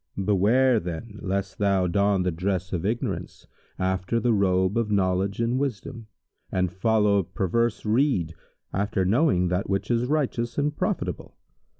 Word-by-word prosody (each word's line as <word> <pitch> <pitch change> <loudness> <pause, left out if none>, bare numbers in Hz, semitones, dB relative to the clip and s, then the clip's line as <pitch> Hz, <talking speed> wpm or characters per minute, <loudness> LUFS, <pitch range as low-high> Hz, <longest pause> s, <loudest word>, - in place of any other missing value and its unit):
Beware, 105 +6 +3
then, 90 +5 -7
lest 100 -1 -3
thou 100 -2 +2
don 100 +1 +2
the 90 - 0
dress 90 +2 -2
of 90 +2 -1
ignorance, 115 +3 -4 0.3
after 95 +4 0
the 115 +1 +2
robe 95 -1 +2
of 115 -2 0
knowledge 95 0 0
and 120 +2 +1
wisdom, 120 -3 -4 0.4
and 90 -2 0
follow 105 -1 +2
perverse 105 +6 -1
rede, 110 - +1 0.4
after 100 -1 0
knowing 100 - +2
that 90 +2 -1
which 95 +4 -1
is 120 +1 +1
righteous 125 -5 -1
and 150 +1 0
profitable. - - -3
100 Hz, 140 wpm, -25 LUFS, 95-115 Hz, 0.4 s, Beware